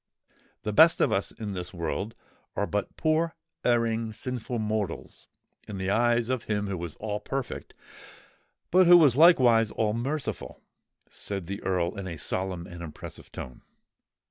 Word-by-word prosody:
"The 105 - -2
best 160 +7 +7
of - - +3
us 100 - 0
in 105 -3 -6
this 90 0 -6
world 85 +6 -3 0.4
are 100 - 0
but 105 0 -3
poor, 160 +1 +1 0.3
erring, 115 -2 +1
sinful 125 +1 -4
mortals 105 -5 -3 0.4
in 100 - -6
the 95 0 -1
eyes 120 +1 +2
of 130 -2 -2
Him 105 -1 -1
who 95 -4 -4
is 85 -3 -6
all 105 -1 -3
perfect 135 +2 -5 1.0
but 185 0 +6
who 175 -2 +9
is 130 -5 +4
likewise 125 -9 +6
all 105 0 0
merciful," 135 +6 -3 0.5
said 100 -3 -4
the 100 +4 -5
Earl 90 +1 -1
in 95 - -5
a 85 -3 -5
solemn 95 +2 -2
and 85 -1 -10
impressive 80 -3 -9
tone. 65 - -8
110 Hz, 155 wpm, -27 LUFS, 95-125 Hz, 1.0 s, who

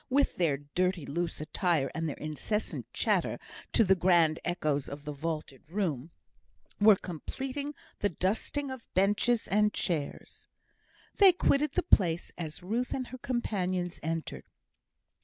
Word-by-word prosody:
with 280 +2 +2
their 160 -6 +2
dirty, 175 +3 -1
loose 170 +3 -2
attire, 155 -2 0
and 160 +1 -2
their - - -5
incessant 155 +8 -3
chatter, - - +1 0.3
to 230 - +5
the 190 -2 +5
grand 170 -3 +3
echoes 155 -5 -1
of 145 +1 -8
the 150 - -3
vaulted 150 -2 -4
room) 165 -7 -2 0.7
were 210 0 +8
completing 270 - -5 0.2
the 205 - +1
dusting 220 - -1
of 260 -2 -6
benches 210 +5 +2
and 210 +1 +3
chairs. 160 -6 -3 0.7
They 395 -2 +9
quitted 300 -4 +2
the - - +1
place 175 -4 +2
as 160 0 -6
Ruth 230 +7 -1
and 255 -2 -4
her 255 - -8
companions 185 -8 -2
entered. 160 - -4
180 Hz, 140 wpm, -30 LUFS, 155-220 Hz, 0.7 s, They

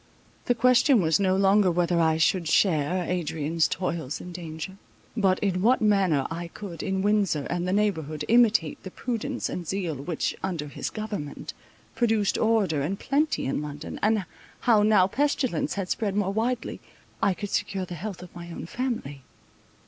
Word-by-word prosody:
The 245 - +2
question 250 +2 +5
was 160 -2 +2
no 190 -1 +2
longer 195 0 +4
whether 175 0 +1
I 160 -1 +3
should 170 +1 +2
share 175 +1 +2
Adrian's 165 -2 0
toils 165 -6 -3
and 180 - -9
danger; 170 +2 -7 0.4
but 195 -5 +3
in 185 -3 0
what 245 +5 +4
manner 195 -10 +2
I 170 +1 -4
could, 175 -1 -8
in 190 -1 -1
Windsor 200 -8 +1
and 175 +1 -1
the - - 0
neighbourhood, 160 -7 0
imitate 225 -9 +3
the 185 - -7
prudence 250 +5 -3
and 175 -2 -5
zeal 185 -3 -2
which, 150 +4 -2
under 170 -6 -3
his - - -4
government, 210 -10 -5 0.4
produced 225 -4 +1
order 210 -10 +2
and 175 +8 -2
plenty 300 +4 0
in 135 - -1
London, 145 -1 -7
and 215 -2 +2 0.4
how, 225 -4 +4
now 210 -3 +5
pestilence 255 - 0
had 195 -3 -3
spread 205 -3 -1
more 200 -1 0
widely, 235 +3 -1 0.4
I 190 - +2
could 205 +1 -6
secure 190 -2 -1
the 180 - -8
health 180 +2 -6
of 180 - -14
my 170 0 -8
own 165 - -6
family. 220 - -4
190 Hz, 170 wpm, -26 LUFS, 165-215 Hz, 0.4 s, question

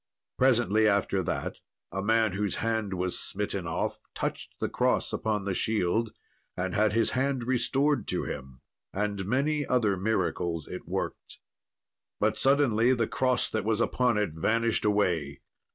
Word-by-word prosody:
Presently 115 -4 +4
after 100 -2 +2
that, 85 - -3 0.3
a 95 - -2
man 110 +1 +2
whose 100 +1 -1
hand 110 -4 -1
was 90 0 -1
smitten - - -2
off - - -2 0.2
touched - - -4
the - - 0
cross - - 0
upon 105 -3 -1
the 100 - -1
shield, 110 +2 0 0.5
and 90 0 -2
had 105 0 +2
his 115 0 +2
hand 130 -1 0
restored 135 +4 +1
to - - 0
him; 65 0 -7 0.3
and 100 -1 -2
many 145 +5 +1
other 120 -7 +2
miracles 90 -5 -1
it - - -8
worked. - - -4 0.8
But 110 +1 +2
suddenly 130 -3 +4
the 115 -2 +1
cross 130 -2 +1
that 110 - -1
was 110 0 0
upon 120 -1 +2
it 105 -5 0
vanished 115 +8 +1
away. 90 -9 +1
110 Hz, 150 wpm, -28 LUFS, 95-120 Hz, 0.8 s, Presently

